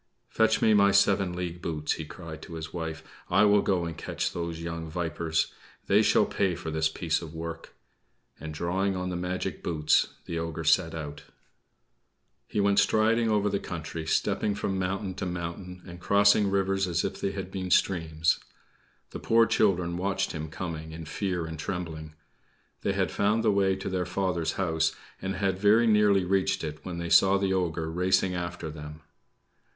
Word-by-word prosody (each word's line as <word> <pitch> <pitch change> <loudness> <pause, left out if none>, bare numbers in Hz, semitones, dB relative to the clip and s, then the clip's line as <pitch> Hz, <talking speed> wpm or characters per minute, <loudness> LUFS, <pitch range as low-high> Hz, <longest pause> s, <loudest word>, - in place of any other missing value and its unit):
"Fetch 110 0 +2
me 110 - +5
my 100 -1 +6
seven 100 -2 +3
league 90 -1 -4
boots," 75 -3 -1
he 80 - -5
cried 80 0 -9
to 85 - -9
his 80 -1 -7
wife. 80 -3 -5 0.3
"I 95 +4 +4
will 105 0 +5
go 90 -4 0
and 85 -1 -5
catch - - -3
those 85 -1 -4
young 85 -1 -5
vipers. 80 -1 -1 0.3
They - - +4
shall - - +4
pay 95 -3 0
for 80 - -5
this 80 0 +1
piece 80 0 -1
of 80 -1 -9
work!" 85 0 -7 0.6
And, 80 - -6
drawing 95 +5 -1
on 90 0 -3
the - - -3
magic 90 +1 -3
boots, 75 -3 +2 0.2
the 85 - -3
ogre 80 0 -4
set 80 +1 +3
out. 75 -2 -7 1.2
He - - -2
went 100 0 +4
striding 115 +1 +3
over 105 -1 +2
the 100 -1 0
country, 80 -1 -6
stepping 105 +5 +1
from 95 -1 -2
mountain 95 +1 -2
to 95 - -4
mountain, 90 +1 -6
and 85 -1 -10
crossing 100 +2 +4
rivers 95 0 +1
as 85 -1 0
if - - -4
they 100 - -1
had 95 -1 -5
been 95 -1 -4
streams. 80 -4 +2 0.7
The - - -6
poor 115 0 +4
children 90 -6 +1
watched 95 +2 -1
him 80 -1 -5
coming 80 -1 -6
in 80 0 -7
fear 90 +1 -2
and 80 -1 -7
trembling. 80 -4 -5 0.7
They - - 0
had - - 0
found 105 +3 +1
the 110 - +4
way 95 -1 +2
to 95 - -6
their 90 -2 -1
father's 90 -3 -1
home, 85 -4 -2 0.4
and 95 +1 -3
had 95 -1 0
very 105 +4 +5
nearly 105 -4 +4
reached 95 0 +1
it 75 -1 -6
when 90 -2 -5
they 85 0 -4
saw 95 0 +6
the 95 -1 0
ogre 85 -3 -1
racing 90 +2 +2
after 85 -2 -4
them. 75 0 -9
90 Hz, 180 wpm, -28 LUFS, 80-95 Hz, 1.2 s, my